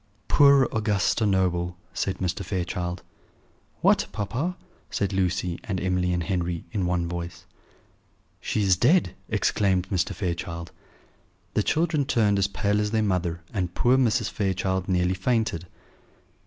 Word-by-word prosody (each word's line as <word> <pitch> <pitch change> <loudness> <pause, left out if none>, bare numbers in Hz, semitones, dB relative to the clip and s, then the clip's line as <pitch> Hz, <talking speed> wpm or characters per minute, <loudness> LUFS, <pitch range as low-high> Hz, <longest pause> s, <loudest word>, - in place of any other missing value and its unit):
"Poor 140 -3 +6
Augusta 105 0 +1
Noble!" 90 -2 +1 0.2
said 95 - -2
Mr. 95 +2 -2
Fairchild. 90 -1 -3 0.8
"What, - - +4
papa?" 115 - -2 0.3
said 100 -1 -1
Lucy 90 -2 0
and 95 -3 -2
Emily 90 -1 0
and 90 -1 0
Henry, 85 -3 -2
in 95 -5 -1
one 90 -1 0
voice. 85 0 -6 0.9
"She 105 - -1
is 95 -2 +4
dead!" 155 - +3 0.2
exclaimed 95 -3 +1
Mr. 95 -3 0
Fairchild. 85 -2 -4 0.8
The - - +2
children 155 -3 +1
turned 105 -7 +2
as 95 - +3
pale 105 0 0
as 105 - 0
their 110 0 +1
mother; 90 -4 -1
and 90 -4 -2
poor 125 +2 +4
Mrs. 120 -4 +2
Fairchild 95 -2 -1
nearly 90 0 +2
fainted. 100 -3 -1
95 Hz, 135 wpm, -25 LUFS, 90-105 Hz, 0.9 s, Poor